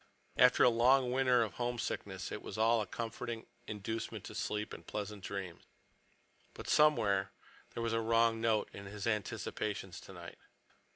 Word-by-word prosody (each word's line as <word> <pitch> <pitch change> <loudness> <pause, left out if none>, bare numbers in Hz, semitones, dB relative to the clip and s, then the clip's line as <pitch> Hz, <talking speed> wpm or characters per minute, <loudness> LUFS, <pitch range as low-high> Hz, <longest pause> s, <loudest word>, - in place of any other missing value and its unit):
After 125 - +6
a - - +8
long 125 +2 +4
winter 125 -2 +4
of 105 -4 -4
homesickness 120 -6 -3
it - - -5
was - - -7
all 115 +1 +4
a 105 - -4
comforting 115 +2 -5 0.2
inducement 110 +2 -4
to - - -8
sleep 105 0 -3
and - - -9
pleasant 105 -1 -5
dreams. 95 -4 -5 0.9
But - - -8
somewhere 115 -11 +4 0.5
there 115 - -2
was 115 0 0
a 115 - +1
wrong 115 0 +3
note 110 -2 +2
in 100 0 -8
his 100 0 -6
anticipations 105 -3 -2
tonight. - - -10
115 Hz, 155 wpm, -34 LUFS, 105-120 Hz, 0.9 s, a